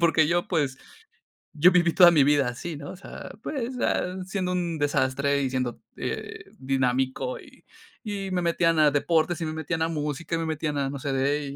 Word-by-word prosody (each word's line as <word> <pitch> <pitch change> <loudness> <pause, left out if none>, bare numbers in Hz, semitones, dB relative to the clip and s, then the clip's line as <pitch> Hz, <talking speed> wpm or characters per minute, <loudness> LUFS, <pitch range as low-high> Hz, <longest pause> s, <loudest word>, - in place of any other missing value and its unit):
porque 165 -2 +4
yo, 175 +1 0
pues, 145 -7 0 0.8
yo 170 +5 +5
viví 175 -2 +3
toda 175 -2 +8
mi 150 -4 +5
vida 145 -2 +3
así, 155 +7 -6
¿no?, 145 +5 -8
o - - -9
sea, - - -9
pues, 260 -3 -3
ah, 180 +1 0
siendo 185 -1 -2
un 170 -3 -2
desastre 140 0 +1
y 130 - 0
siendo, 125 -2 -2 0.2
eh, - - -5
dinámico, 130 - -1
y - - -17 0.4
y 200 -3 -4
me 180 -1 0
metían 165 -1 +2
a 150 - +6
deportes 160 +3 +1
y - - -1
me 155 - -3
metían 160 +1 -2
a - - +1
música 150 +1 -4
y - - -1
me 165 - -2
metían 155 -1 -2
a 135 -1 0
no 140 - -5
sé 135 0 -3
de 140 +1 -1
155 Hz, 205 wpm, -26 LUFS, 140-175 Hz, 0.8 s, toda